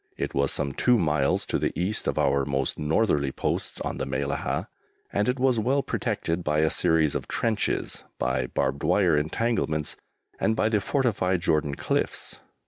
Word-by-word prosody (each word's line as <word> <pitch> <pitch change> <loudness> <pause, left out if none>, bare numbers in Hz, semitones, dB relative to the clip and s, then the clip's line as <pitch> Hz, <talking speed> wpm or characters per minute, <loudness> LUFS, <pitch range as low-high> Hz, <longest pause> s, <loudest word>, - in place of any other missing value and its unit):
It - - -3
was 70 0 +2
some 70 - -1
two 125 - +3
miles 75 -7 +1
to - - -1
the - - -2
East 95 +5 -1
of - - 0
our 70 -1 +2
most 70 -1 -1
northerly 75 -3 +1
posts - - -2
on - - -3
the 65 - -2
Mellahah, 70 +1 -2 0.5
and 105 +4 +1
it 125 - 0
was 130 -2 +2
well 135 +5 +1
protected 85 +2 -2
by 75 0 +1
a 80 - +2
series 80 -4 +2
of - - -3
trenches, 110 -2 -1
by 65 0 0
barbed 70 +3 -1
wire 90 -6 +3
entanglements, 75 -1 0 0.4
and 110 - +2
by 110 - +2
the 105 -2 +1
fortified 100 -8 +1
Jordan 75 -4 +1
cliffs. - - -2
80 Hz, 170 wpm, -26 LUFS, 70-110 Hz, 0.5 s, two